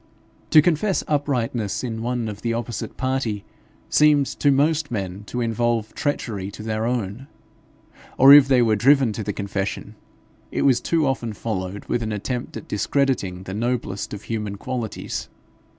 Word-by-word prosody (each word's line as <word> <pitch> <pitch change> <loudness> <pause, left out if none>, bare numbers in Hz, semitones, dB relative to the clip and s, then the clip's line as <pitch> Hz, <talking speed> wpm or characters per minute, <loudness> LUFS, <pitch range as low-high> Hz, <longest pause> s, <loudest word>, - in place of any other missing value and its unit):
To 155 - +7
confess 175 +4 +1
uprightness 125 -8 -1
in 115 -3 -4
one 120 -1 -2
of 105 -1 -6
the 115 -1 -1
opposite 120 0 -5
party, 130 -6 -2 0.4
seemed 150 -2 +4
to 145 - +3
most 145 +2 +2
men 100 -4 -4
to 125 +3 -4
involve 115 -1 0
treachery 115 -10 -2
to 105 - -8
their 110 +1 -1
own; 120 +1 -3 0.9
or 135 +2 +9
if 145 -2 +9
they 130 -3 +4
were 110 -2 +3
driven 130 +1 +4
to 110 - -4
the 105 - -2
confession, 100 +1 -4 0.6
it - - -1
was 130 -3 +4
too 165 -2 +1
often 120 -4 -1
followed 100 -3 -4
with 120 - -1
an 110 -1 -3
attempt 120 +4 -4
at - - -10
discrediting 105 -5 0
the 95 - -7
noblest 115 -3 -2
of 105 0 -7
human 105 -3 -3
qualities. 115 +2 -5
115 Hz, 160 wpm, -23 LUFS, 105-135 Hz, 0.9 s, or